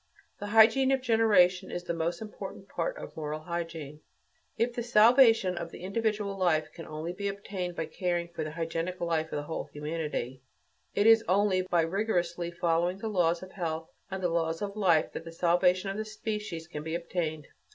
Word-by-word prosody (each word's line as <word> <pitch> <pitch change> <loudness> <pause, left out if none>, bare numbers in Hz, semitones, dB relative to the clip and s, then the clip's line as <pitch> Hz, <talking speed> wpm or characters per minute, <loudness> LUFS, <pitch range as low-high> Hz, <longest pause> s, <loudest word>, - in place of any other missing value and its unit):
The 205 - -5
hygiene 225 +5 +6
of 265 -1 +2
generation 200 -6 +4
is 175 - -4
the 175 - -2
most 170 +4 -2
important 210 - -8
part - - -3
of - - -9
moral 155 -1 -4
hygiene. 165 -3 -5 0.6
If 235 +1 +1
the 240 - -3
salvation 225 -4 +5
of 170 -1 -5
the - - -11
individual 210 0 -1
life 175 -5 +1
can 165 - -9
only 155 +3 -5
be 200 +2 -3
obtained 195 -3 -4
by 160 - -2
caring 175 +1 -2
for 165 -2 -4
the 155 - -4
hygienic 165 +3 -3
life 165 -2 0
of - - -6
the 145 - -2
whole 160 +2 -4
of - - -22
humanity, 150 -4 -4 0.5
it 205 - +2
is 225 0 +7
only 190 0 +3
by 175 -2 +1
rigorously 175 -2 -1
following 170 +1 0
the 220 +3 -4
laws 175 -3 +1
of 185 - -10
health 165 -4 -4 0.2
and 190 -1 -5
the 175 - +2
laws 165 +1 -1
of 200 0 -4
life 175 -7 +3
that - - -6
the 165 - -9
salvation 180 +3 +2
of 195 - -5
the 215 - -3
species 210 -6 -5
can 150 -3 -6
be 160 +2 -3
obtained. 165 -3 -3
175 Hz, 195 wpm, -29 LUFS, 165-205 Hz, 0.6 s, is